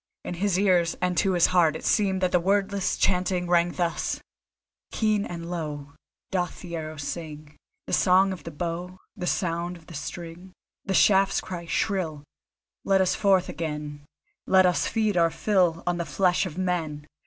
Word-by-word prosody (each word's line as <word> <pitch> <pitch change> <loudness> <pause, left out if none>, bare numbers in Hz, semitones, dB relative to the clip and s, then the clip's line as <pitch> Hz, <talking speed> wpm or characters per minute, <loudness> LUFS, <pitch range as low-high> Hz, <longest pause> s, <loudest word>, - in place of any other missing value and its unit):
In - - -4
his 185 +1 0
ears 180 -4 +3
and 180 0 0
to 195 -2 +2
his 175 -2 +4
heart 170 -4 +3
it - - -7
seemed 190 -3 +2
that 185 -1 +1
the 180 - +4
wordless 195 +1 0
chant 180 -1 +2
rang 175 -1 +1
thus: 175 -2 -1 0.7
Keen 215 -2 +1
and 170 -1 -6
low 150 -4 -5 0.4
Doth 180 -2 -2
the 170 -2 -6
arrow 155 -1 -5
sing 150 0 -7 0.3
The - - -6
Song 190 +1 +4
of 175 -5 -10
the 165 - -6
Bow, 175 +3 -5 0.2
The 180 -3 -4
sound 175 -1 -1
of 165 - -19
the 170 - -12
string. 170 +4 -7 0.3
The 190 - -1
shafts 195 0 +4
cry 170 -2 -7
shrill: 165 -7 -1 0.6
Let 195 -1 +3
us 190 -1 +2
forth 190 -3 +3
again, 150 -2 -5 0.4
Let 190 -1 +5
us 180 -1 +2
feed 215 -4 0
our 170 -1 +4
fill 180 -3 +1
On 175 0 0
the 170 - -2
flesh 185 +1 +1
of 165 - -9
men. 165 -5 -2
175 Hz, 175 wpm, -26 LUFS, 165-190 Hz, 0.7 s, Let